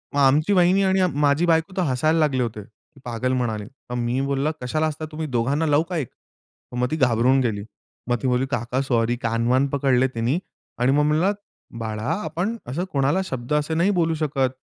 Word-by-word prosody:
मग - - +2
आमची 150 +8 +4
वाहिनी 185 +2 +4
आणि 190 -1 +3 0.2
माझी 145 +4 +3
बायको 165 +2 +2
तर - - +2
हसायला 155 +5 +1
लागले 135 -5 +2
होते 110 -2 -4
की 110 +7 -24
पागल 125 +2 -2
म्हणाले. 110 -5 -1 0.2
मग 125 - -3
मी 120 +2 -1
बोललं, 140 +2 0
"कशाला 155 +6 0
हसता 155 +1 -4
तुम्ही 155 0 -4
दोघांना 135 +5 0
लाऊ 150 +1 +3
का 175 - -2
एक." 135 -7 -3 0.6
मग 125 0 0
ती - - +1
घाबरून 130 -1 +3
गेली. 105 -4 -1 0.4
मग 120 - +2
ती 130 - 0
म्हणाली, 125 +1 +1
"काका 125 +1 -1
सॉरी," 120 -2 +1
कान-वान 120 +4 +2
पकडले 130 -2 +2
तिनी 120 +9 0 0.4
आणि 125 +2 +3
मग 150 +1 +3
म्हणलं, 160 +7 +2 0.5
"बाळा, 110 -1 -4 0.2
आपण 200 +7 -2
असं 155 +9 -2
कोणाला 140 +6 +1
शब्द 125 -3 -4
असे 150 +2 0
नाही 170 +5 +2
बोलू 165 -1 +2
शकत, 140 -4 0
135 Hz, 195 wpm, -23 LUFS, 125-155 Hz, 0.6 s, आमची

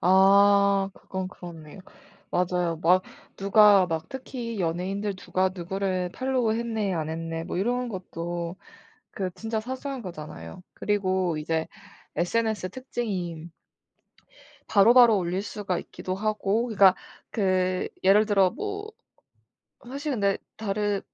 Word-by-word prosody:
아. 195 +1 +5
그건 190 -1 -5
그렇네요. 170 -1 -11 0.5
맞아요. 180 -2 0
막 180 +3 +5 0.3
누가 200 -1 +6
막 165 -2 -3
특히 240 -5 -6
연예인들 190 +4 -2
"누가 185 0 0
누구를 185 0 -2
팔로우 255 -4 0
했네 225 -4 -1
안 160 -3 -2
했네." 165 0 -4
뭐 175 - -4
이런 245 +5 0
것도 175 -2 -5 0.5
그 190 -3 -3
진짜 220 +3 -3
사소한 260 +2 -5
거잖아요. 150 - -8
그리고 185 -4 0
이제 160 +1 -1 0.5
SNS 220 +2 0
특징이 185 -10 -4 1.2
바로바로 230 +2 +7
올릴 185 +1 -1
수가 200 -4 -3
있기도 185 - -5
하고 215 +2 0
그러니까 195 -5 +5 0.4
그 185 -3 +1
예를 200 +3 +5
들어 195 -3 +4
뭐 410 - -5 1.0
사실 280 +3 -4
근데 200 -4 +1 0.2
다른 205 -1 -1
195 Hz, 250 characters per minute, -26 LUFS, 180-220 Hz, 1.2 s, 바로바로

